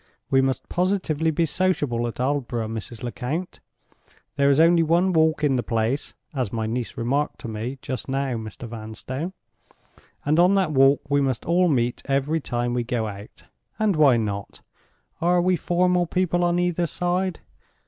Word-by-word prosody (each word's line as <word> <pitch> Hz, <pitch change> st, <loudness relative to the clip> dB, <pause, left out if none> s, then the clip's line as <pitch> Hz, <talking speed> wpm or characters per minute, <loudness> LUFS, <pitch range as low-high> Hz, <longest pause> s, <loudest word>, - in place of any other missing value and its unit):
We 135 Hz, -, +5 dB
must 130 Hz, -1 st, -1 dB
positively 175 Hz, -4 st, 0 dB
be 165 Hz, +2 st, +1 dB
sociable 145 Hz, -9 st, 0 dB
at 115 Hz, -, -7 dB
Aldborough, 125 Hz, -4 st, -1 dB
Mrs. 115 Hz, +2 st, -6 dB
Lecount. 135 Hz, +9 st, -4 dB, 0.8 s
There 140 Hz, -1 st, +3 dB
is 140 Hz, +1 st, +4 dB
only 165 Hz, +1 st, +6 dB
one 170 Hz, +3 st, +2 dB
walk 160 Hz, -1 st, +2 dB
in 135 Hz, -3 st, +3 dB
the -, -, +1 dB
place 115 Hz, +4 st, -1 dB, 0.2 s
(as 125 Hz, -7 st, -2 dB
my 110 Hz, -1 st, -2 dB
niece 120 Hz, +2 st, -3 dB
remarked 140 Hz, +6 st, -1 dB
to -, -, -6 dB
me 115 Hz, +5 st, -4 dB
just 130 Hz, 0 st, -4 dB
now, 135 Hz, 0 st, -1 dB
Mr. 110 Hz, +1 st, -7 dB
Vanstone); 115 Hz, -, -6 dB, 0.9 s
and 150 Hz, +3 st, +2 dB
on 180 Hz, +3 st, +5 dB
that 190 Hz, -5 st, +2 dB
walk 135 Hz, 0 st, +4 dB
we 145 Hz, 0 st, +2 dB
must 130 Hz, -3 st, -1 dB
all 180 Hz, +2 st, +3 dB
meet 125 Hz, -6 st, 0 dB
every 140 Hz, +3 st, 0 dB
time 120 Hz, -3 st, -2 dB
we 120 Hz, -1 st, 0 dB
go 120 Hz, -2 st, -1 dB
out. 100 Hz, 0 st, -9 dB, 0.3 s
And 215 Hz, -4 st, +2 dB
why 145 Hz, -6 st, +5 dB
not? 100 Hz, -3 st, -4 dB, 0.6 s
Are 175 Hz, +1 st, +3 dB
we 180 Hz, +1 st, +3 dB
formal 180 Hz, 0 st, +1 dB
people 175 Hz, 0 st, +1 dB
on 175 Hz, 0 st, +2 dB
either 175 Hz, -1 st, +1 dB
side? 180 Hz, +2 st, -1 dB
140 Hz, 170 wpm, -24 LUFS, 120-175 Hz, 0.9 s, only